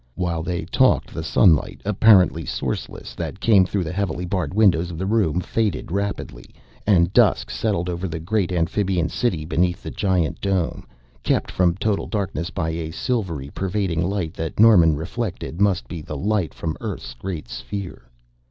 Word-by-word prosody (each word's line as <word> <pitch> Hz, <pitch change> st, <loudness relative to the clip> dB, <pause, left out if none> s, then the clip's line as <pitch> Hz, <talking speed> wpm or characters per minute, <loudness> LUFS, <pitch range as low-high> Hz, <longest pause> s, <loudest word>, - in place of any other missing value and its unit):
While 85 Hz, -3 st, -1 dB
they 85 Hz, -1 st, -3 dB
talked, 130 Hz, +8 st, +2 dB
the 80 Hz, -, -4 dB
sunlight, 80 Hz, 0 st, +3 dB
apparently 100 Hz, -5 st, +5 dB
sourceless, -, -, -4 dB
that 95 Hz, -, -5 dB
came 100 Hz, -4 st, +4 dB
through 100 Hz, -1 st, -1 dB
the 80 Hz, -, -4 dB
heavily 90 Hz, -2 st, -2 dB
barred 90 Hz, -5 st, -2 dB
windows 90 Hz, -5 st, +3 dB
of 85 Hz, -, -7 dB
the 95 Hz, -, -2 dB
room 100 Hz, -6 st, +1 dB
faded 105 Hz, -2 st, -2 dB
rapidly, 100 Hz, -11 st, -4 dB, 0.3 s
and 90 Hz, -3 st, +4 dB
dusk -, -, +3 dB
settled 100 Hz, -6 st, -1 dB
over 90 Hz, +1 st, -3 dB
the 80 Hz, -2 st, -4 dB
great 95 Hz, +2 st, -1 dB
amphibian 90 Hz, 0 st, 0 dB
city 90 Hz, -11 st, -1 dB
beneath 90 Hz, +3 st, 0 dB
the -, -, -5 dB
giant 95 Hz, -5 st, 0 dB
dome, 95 Hz, -4 st, -1 dB, 0.3 s
kept -, -, 0 dB
from 90 Hz, -2 st, +2 dB
total 100 Hz, +1 st, -1 dB
darkness 95 Hz, -4 st, -2 dB
by 80 Hz, -4 st, -2 dB
a 80 Hz, -1 st, -4 dB
silvery 80 Hz, -, -3 dB
pervading 95 Hz, -3 st, -1 dB
light 90 Hz, -3 st, -2 dB
that 80 Hz, 0 st, -5 dB
Norman 90 Hz, -8 st, +7 dB
reflected 90 Hz, +2 st, -4 dB
must 100 Hz, -3 st, +2 dB
be 85 Hz, -, -6 dB
the 75 Hz, -1 st, -6 dB
light 100 Hz, -3 st, 0 dB
from 80 Hz, -1 st, -4 dB
Earth's -, -, -5 dB
great 80 Hz, +4 st, -6 dB
sphere. 85 Hz, -5 st, -7 dB
90 Hz, 165 wpm, -22 LUFS, 80-100 Hz, 0.3 s, Norman